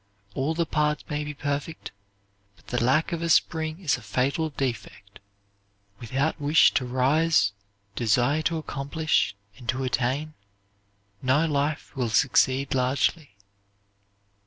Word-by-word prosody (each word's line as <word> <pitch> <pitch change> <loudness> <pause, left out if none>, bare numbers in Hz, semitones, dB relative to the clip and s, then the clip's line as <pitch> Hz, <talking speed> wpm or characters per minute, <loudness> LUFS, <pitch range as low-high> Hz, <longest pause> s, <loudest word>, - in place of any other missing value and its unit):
All 145 +7 -1
the 170 0 +1
parts 150 -1 0
may 150 0 -2
be 150 0 -6
perfect, 145 +3 -4 0.6
but - - -25
the 125 -2 0
lack 135 +6 +2
of 170 -1 -3
a 170 - -2
spring 160 0 +1
is 160 -9 +1
a - - -12
fatal 130 +10 -1
defect. 115 -7 -5 0.8
Without 135 +7 -2
wish 150 +3 +5
to 130 - 0
rise, 135 +2 +2 0.4
desire 120 +7 +2
to 165 +1 0
accomplish 155 -4 -1 0.2
and 120 - -9
to 130 +1 0
attain, 130 +4 -1 0.9
no 135 +5 +2
life 145 -1 -2
will 125 -3 -1
succeed 130 +3 +2
largely. 130 0 0
140 Hz, 130 wpm, -26 LUFS, 130-155 Hz, 0.9 s, wish